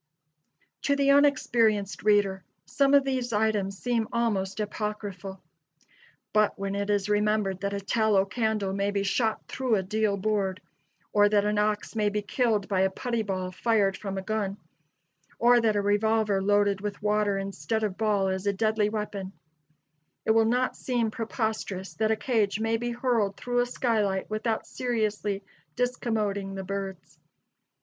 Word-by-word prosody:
To 280 - +2
the 280 0 +3
unexperienced 235 -8 +3
reader 200 -3 +2 0.2
some 275 0 +3
of 280 - +6
these 260 -3 -2
items 210 -2 0
seem 235 0 -1
almost 215 -5 -1
apocryphal. 205 -3 -5 0.9
But 215 -1 +3
when 195 0 -3
it 200 +1 -2
is 205 -1 +1
remembered 210 -2 +1
that 200 0 -2
a - - -2
tallow 205 -1 +2
candle 215 -2 -1
may 200 +1 0
be 200 -1 -1
shot 220 +2 0
through 255 -4 0
a 190 - 0
deal 210 +1 0
board, 195 -2 -1 0.5
or 205 0 +5
that 205 -1 +3
an 210 0 +1
ox 210 +1 -1
may 210 -1 +2
be 210 0 -2
killed 215 -2 0
by 190 -3 +1
a 190 - +3
putty 235 +4 -2
ball 185 -3 -3
fired 200 -1 +1
from 195 -1 -5
a 190 - -3
gun, 205 -1 -2 0.8
or 240 0 +5
that 220 -2 +2
a 205 - +2
revolver 210 0 +2
loaded 205 0 +2
with 205 0 -4
water 210 -1 +1
instead 195 +3 -3
of 205 -3 -1
ball 210 -3 +1
is 190 +1 -2
a 200 - +2
deadly 215 0 +1
weapon, 210 -3 -4 0.9
it - - +3
will 225 0 +4
not 250 +3 +1
seem 240 -4 -1
preposterous 220 -4 -3
that 220 0 0
a 220 - +3
cage 215 -4 0
may 225 +1 +1
be 240 +1 -2
hurled 235 -5 0
through 245 0 -1
a 245 - +2
skylight 215 -6 0
without 220 +1 -1
seriously 215 -5 -2 0.3
discommoding 215 -5 -1
the 190 - -4
birds. 195 -2 -6
210 Hz, 160 wpm, -27 LUFS, 200-225 Hz, 0.9 s, of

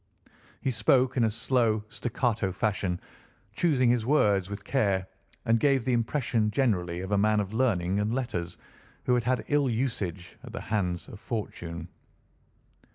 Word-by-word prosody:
He 135 - 0
spoke 125 +3 +3
in 125 - +3
a - - +2
slow 115 -1 +1
staccato 115 -3 -1
fashion, 95 -2 -1 0.5
choosing 140 -8 +2
his 120 -2 +1
words 105 -8 +3
with 100 0 -6
care, 100 -7 +1 0.4
and 115 -1 +3
gave 135 -3 +3
the 130 - +1
impression 115 -2 +1
generally 90 -8 0
of 95 +2 -6
a 100 - +3
man 105 +1 +3
of 100 0 -3
learning 100 -6 +1
and 105 +1 0
letters 115 -9 -3 0.5
who 125 - +2
had 120 -1 +2
had 125 +1 0
ill 145 -2 +3
usage 110 -8 -3
at - - -10
the - - -4
hands 90 -4 -1
of 105 - -10
fortune. 85 -7 -5
110 Hz, 160 wpm, -28 LUFS, 95-125 Hz, 0.5 s, spoke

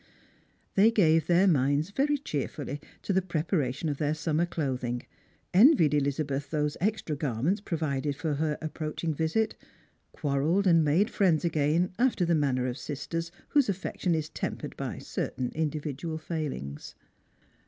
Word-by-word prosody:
They 205 +3 +6
gave 165 -8 +3
their 175 +2 +5
minds 145 0 +2
very 290 +6 +1
cheerfully 145 - -4 0.2
to 200 - 0
the 190 - +3
prepa 170 0 -1
ration 135 +4 -2
of 145 -2 -2
their 150 0 +1
summer 160 +2 0
clothing; 125 -7 -2 0.5
envied 195 - +6
Elizabeth 140 -1 0
those 150 -1 0
extra 200 -6 0
garments 145 - -1
provided 150 -6 -2
for 155 +2 -2
her 150 +1 -1
approaching 155 +1 -3
visit; 160 +9 0 0.6
quarrelled 150 +7 +1
and 165 -3 +5
made 170 +10 +2
friends 175 -6 +2
again 160 +2 +1
after 240 -7 +2
the 170 - +2
manner 135 -5 +1
of 125 +1 -3
sisters 165 +4 -4 0.2
whose 285 -6 +3
affection 185 -2 -1
is 155 -1 -2
tempered - - -5
by - - -4
certain 125 -1 -3
individual 155 0 -3
failings. 150 - -5
155 Hz, 145 wpm, -28 LUFS, 145-175 Hz, 0.6 s, They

